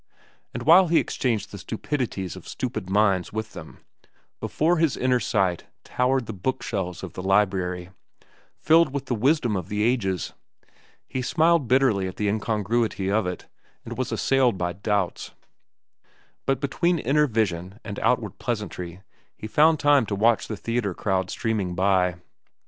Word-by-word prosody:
And 120 - -5
while 175 +6 +7
he 165 0 +3
exchanged 115 -6 -1
the 100 - -8
stupidities 110 - -3
of - - -11
stupid 110 -7 -4
minds 95 -2 +2
with 110 0 -5
them, - - -11 0.6
before 170 +3 +1
his 160 -3 +1
inner 125 0 +2
sight 95 -7 0 0.2
towered 130 0 0
the 110 - -6
book 130 +8 -3
shelves 95 -4 -4
of 90 -4 -7
the - - -6
library, 95 -2 0 0.7
filled 160 -3 +4
with 140 -1 -3
the 130 - -2
wisdom 125 -1 +2
of 90 -4 -4
the 105 0 -1
ages. 95 - 0 0.7
He 130 - -3
smiled 160 +2 +2
bitterly 120 -7 +3
at 95 - -7
the 105 - -1
incongruity 105 -1 0
of 105 -2 +1
it, 90 - -5 0.4
and - - -6
was - - -3
assailed 130 -6 +2
by 90 -1 -2
doubts. 100 0 -2 1.1
But 135 -2 +1
between 170 +5 +1
inner 150 +2 +2
vision 100 -4 -2
and 100 -2 -5
outward - - 0
pleasantry 90 +1 -4 0.3
he - - -9
found 155 +7 +4
time 145 -5 +4
to 100 - -2
watch 110 +2 +2
the 110 - -5
theatre 115 -5 -2
crowd 95 -2 -1
streaming 105 -6 -2
by. 90 -1 +2
110 Hz, 155 wpm, -25 LUFS, 95-130 Hz, 1.1 s, while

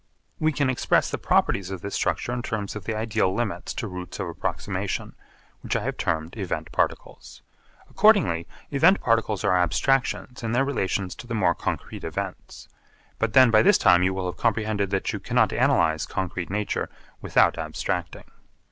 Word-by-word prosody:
We 155 0 +2
can 140 -1 0
express 130 -1 +1
the - - -3
properties 95 -1 +1
of 95 -2 -6
this 100 - -6
structure 120 - -1
in 125 - -2
terms 105 -4 -4
of 105 -3 -7
the 110 - -2
ideal 110 -4 0
limits 100 -7 -3
to 115 - -3
routes 90 -1 -7
of 95 - -2
approximation, 85 - -3 0.5
which - - -3
I - - 0
have - - -2
termed 80 +2 -2
event 95 -4 -4
particles. - - -3 0.4
Accordingly 190 - +3 0.2
event 165 +7 +5
particles 115 -3 0
are 95 -3 +3
abstractions 125 +8 0
in 115 -1 -2
their 135 +3 +2
relations 95 -8 -1
to 120 - -10
the 115 - -3
more 90 -5 +3
concrete - - -5
events. - - -6 0.5
But 115 -1 0
then 130 -2 +7
by 110 -1 +6
this - - +5
time 90 0 +5
you 95 +1 +2
will 95 -1 -3
have 90 - -4
comprehended 110 -3 0
that 95 0 -1
you - - -3
cannot - - +2
analyse 80 0 +2
concrete 90 -2 -3
nature 105 +2 -2 0.3
without - - +3
abstracting. - - -3
105 Hz, 175 wpm, -25 LUFS, 90-120 Hz, 0.5 s, then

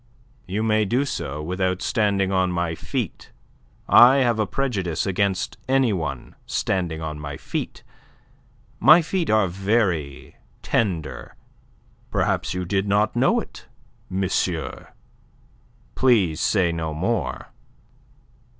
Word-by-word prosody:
"You 100 +4 -2
may 110 -1 +2
do 120 +7 +1
so 75 - -4
without 90 +2 -1
standing 100 -3 +1
on 95 -1 +1
my 85 -1 -1
feet. - - -5 0.6
I 125 +3 +8
have 120 -5 +2
a 110 - +1
prejudice 95 - -2
against 100 -1 -1
any 135 -4 +3
one 80 -8 -4
standing 85 -4 -2
on 75 -1 -5
my 70 -1 -6
feet. - - -5 1.0
My 155 +8 +7
feet 175 +1 -2
are 110 -2 +3
very 90 -6 -1 0.3
tender. 90 -8 -2 0.7
Perhaps - - -1
you 90 0 -3
did 95 +2 -1
not 105 +2 +1
know - - +3
it, - - -10 0.4
monsieur. 95 -3 -2 1.1
Please 100 -11 +2
say 90 -5 +2
no 80 -2 -3
more." 100 +9 -2
95 Hz, 115 wpm, -23 LUFS, 85-110 Hz, 1.1 s, I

